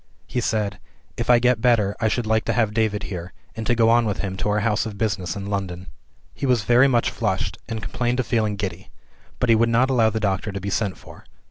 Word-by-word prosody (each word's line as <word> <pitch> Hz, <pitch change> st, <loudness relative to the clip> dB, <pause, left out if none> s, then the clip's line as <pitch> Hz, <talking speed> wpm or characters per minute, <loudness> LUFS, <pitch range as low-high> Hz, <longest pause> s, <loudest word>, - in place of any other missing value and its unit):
He 125 Hz, -, -2 dB
said, 105 Hz, -4 st, -1 dB, 0.4 s
"If 120 Hz, -, -4 dB
I 120 Hz, -, +7 dB
get 125 Hz, -1 st, +2 dB
better 110 Hz, -5 st, +3 dB
I 110 Hz, -, +3 dB
should 115 Hz, +2 st, -1 dB
like 110 Hz, 0 st, +1 dB
to -, -, 0 dB
have 110 Hz, -3 st, +1 dB
David 105 Hz, -2 st, 0 dB
here, 90 Hz, -2 st, -6 dB, 0.2 s
and 110 Hz, 0 st, -5 dB
to 120 Hz, -, +3 dB
go 115 Hz, -1 st, +4 dB
on 120 Hz, 0 st, +4 dB
with 105 Hz, -, -1 dB
him 95 Hz, -2 st, -3 dB
to 105 Hz, -, -1 dB
our 105 Hz, +1 st, +1 dB
house 105 Hz, +1 st, 0 dB
of 105 Hz, -2 st, -7 dB
business 95 Hz, -6 st, -2 dB
in 100 Hz, -1 st, -5 dB
London." 95 Hz, -3 st, -4 dB, 0.5 s
He 140 Hz, -, -3 dB
was 125 Hz, -4 st, +2 dB
very 120 Hz, +3 st, +5 dB
much 120 Hz, -3 st, +2 dB
flushed, 105 Hz, -5 st, -2 dB
and 110 Hz, -3 st, -4 dB
complained 120 Hz, +4 st, -1 dB
of 130 Hz, -, 0 dB
feeling 110 Hz, -3 st, 0 dB
giddy; 95 Hz, -3 st, -5 dB, 0.5 s
but 125 Hz, -, 0 dB
he 115 Hz, -, +7 dB
would 115 Hz, +1 st, +3 dB
not 125 Hz, +3 st, +3 dB
allow 115 Hz, -4 st, +4 dB
the 110 Hz, 0 st, -2 dB
doctor 100 Hz, 0 st, -1 dB
to 100 Hz, -, -5 dB
be 100 Hz, +1 st, -4 dB
sent 100 Hz, -3 st, -1 dB
for. -, -, -14 dB
110 Hz, 245 wpm, -23 LUFS, 100-120 Hz, 0.5 s, I